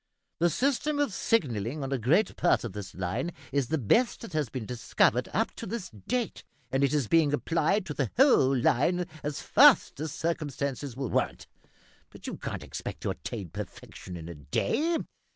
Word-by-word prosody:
The 175 +1 +4
system 280 - 0
of 290 -8 +1
signalling 140 - 0
on 135 - -4
a 135 - 0
great 160 - +2
part 175 - +2
of 115 -5 -5
this 105 -2 -7
line 95 - -2 0.2
is 140 -2 +1
the 160 - 0
best 225 - +2
that 230 -7 -9
has 150 -5 0
been 125 -3 -5
discovered 120 +1 +1
up - - 0
to - - -6
this 225 -4 -5
date, 220 - -3 0.3
and 135 +1 +1
it 140 - +3
is 145 -6 +1
being 160 0 +4
applied 170 +6 +1
to 150 - -4
the 135 -6 -1
whole 140 - +5
line 160 +9 +2 0.2
as 145 -1 -3
fast - - +6
as 155 0 -3
circumstances 140 -5 -3
will 135 -2 -3
warrant; - - -1 0.6
but - - -14
you - - -4
can't - - -5
expect - - -6
to - - -1
attain 95 -4 -6
perfection 90 +3 -8
in 80 -1 -8
a 85 - -6
day. 280 - 0
145 Hz, 185 wpm, -28 LUFS, 120-180 Hz, 0.6 s, fast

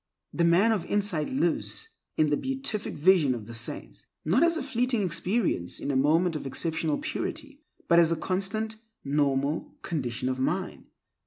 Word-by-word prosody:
The 170 - +1
man 175 +7 +5
of 210 -6 0
insight 200 -7 0
lives 280 +10 -1 0.3
in 155 -1 +3
the - - +4
beatific 265 - -2
vision 155 -5 +4
of 110 -3 -7
the 115 - -9
saints, 110 - -4 0.2
not 180 - +3
as 335 0 +3
a 315 - -3
fleeting 250 -4 0
experience 175 - 0
in 140 - -2
a - - -1
moment 160 +5 +3
of 150 - -4
exceptional 160 +2 -1
purity, 290 -2 -5 0.3
but 170 -1 +6
as 165 -1 +4
a - - +2
constant, 200 +6 -2 0.3
normal 140 +1 0
condition 125 -6 -2
of 130 0 -1
mind. 130 - -2
170 Hz, 165 wpm, -27 LUFS, 145-220 Hz, 0.3 s, but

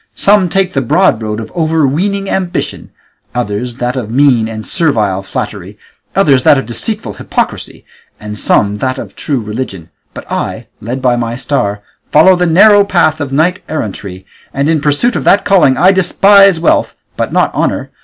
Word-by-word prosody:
Some 200 -3 +2
take 190 0 0
the 135 - 0
broad 130 - +1
road 105 0 -4
of 110 - -8
overweening 165 +5 0
ambition; 185 -2 -3 0.5
others 120 0 -3
that 125 0 -3
of 120 -5 -4
mean 125 -3 +2
and 110 -1 -7
servile 110 - +1
flattery; 100 -1 -6 0.4
others 145 -9 +3
that 140 - +4
of 135 - -3
deceitful 205 - -3
hypocrisy, - - -4 0.3
and 105 0 -7
some 105 0 +1
that 130 +3 -2
of - - -9
true 140 -4 -2
religion; 105 -6 -6 0.2
but - - -8
I, - - -4 0.2
led 125 +5 -5
by 125 -1 +2
my 115 -1 -3
star, 105 -7 -2 0.3
follow 170 +5 +5
the 180 0 0
narrow 205 +5 +5
path 160 -5 +1
of 140 -2 -4
knight 165 +6 0
errantry, 100 -9 -5 0.3
and 140 +1 0
in 160 -2 +1
pursuit 150 +12 +1
of - - -2
that 200 - +3
calling 180 -10 +3
I 185 - +5
despise 195 0 +4
wealth, 165 - +1 0.2
but - - -3
not - - +1
honour. - - -2
140 Hz, 170 wpm, -12 LUFS, 110-180 Hz, 0.5 s, follow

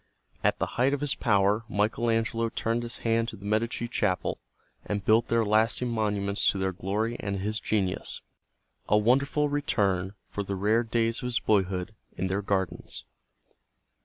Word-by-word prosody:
At - - +3
the - - 0 0.2
height 135 +3 +4
of - - -6
his 145 -2 0
power 105 -1 +2
Michael 110 +3 +1
Angelo 115 0 +1
turned 115 +1 -1
his 120 0 -5
hand 115 0 +2
to - - -6
the 100 - -12
Medici 115 +3 0
Chapel 100 -5 0 0.4
and 100 -2 -3
built 110 +2 +4
there 115 -1 +2
lasting 110 +4 +2
monuments 105 -3 +1
to - - -1
their 95 0 0
glory 105 +5 -2
and 100 -1 -2
his 105 +3 -2
genius, 95 -4 -1 0.7
a 105 - +5
wonderful 140 +7 +3
return 100 -10 0
for 105 - -4
the 100 0 -3
rare 105 +4 +2
days 115 0 0
of 125 - -3
his 120 -1 +1
boyhood 95 -1 +1 0.2
in 95 - -1
their 95 +2 0
gardens. 95 -3 -2
110 Hz, 165 wpm, -28 LUFS, 100-115 Hz, 0.7 s, a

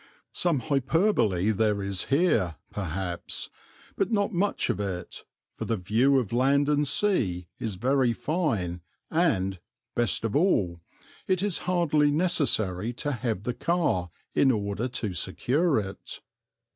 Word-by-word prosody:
Some 165 -7 +2
hyperbole 135 - +2
there 105 -1 +1
is 100 -1 -1
here, 135 - +2 0.2
perhaps, 95 -2 -4 0.4
but 195 +3 0
not 205 -1 +1
much 195 +4 +1
of - - -4
it, 95 -3 -5 0.3
for - - -5
the 115 - 0
view 115 +9 +3
of 120 -5 -1
land 140 +3 +3
and 150 0 +2
sea 115 - +1
is 110 -4 -3
very 130 +4 +2
fine 115 - -1 0.3
and, 95 - +1 0.3
best 115 -8 0
of 115 -2 -1
all, 100 - +2 0.5
it 185 0 +1
is 205 -4 0
hardly 155 -5 +3
necessary 125 - +1
to 145 +4 -3
have 115 -6 -2
the 125 - -2
car 120 - 0 0.2
in 135 - +4
order 105 0 0
to 115 -6 -3
secure 140 - +1
it. 95 -1 -7
120 Hz, 135 wpm, -27 LUFS, 100-155 Hz, 0.5 s, in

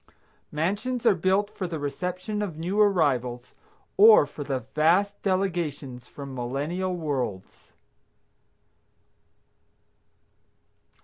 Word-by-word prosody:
Mansions 210 +10 -2
are - - +6
built 190 +3 +1
for 190 -4 -4
the 170 -2 -4
reception 180 +8 -4
of 185 -7 -4
new 185 +6 0
arrivals, 130 - +1 0.4
or 215 -5 +8
for 145 - -8
the 135 -2 -3
vast 180 +7 +2
delegations 165 -10 -2
from 140 -2 -9
millennial 145 +9 -3
worlds. 135 - -4
170 Hz, 90 wpm, -26 LUFS, 140-195 Hz, 0.4 s, or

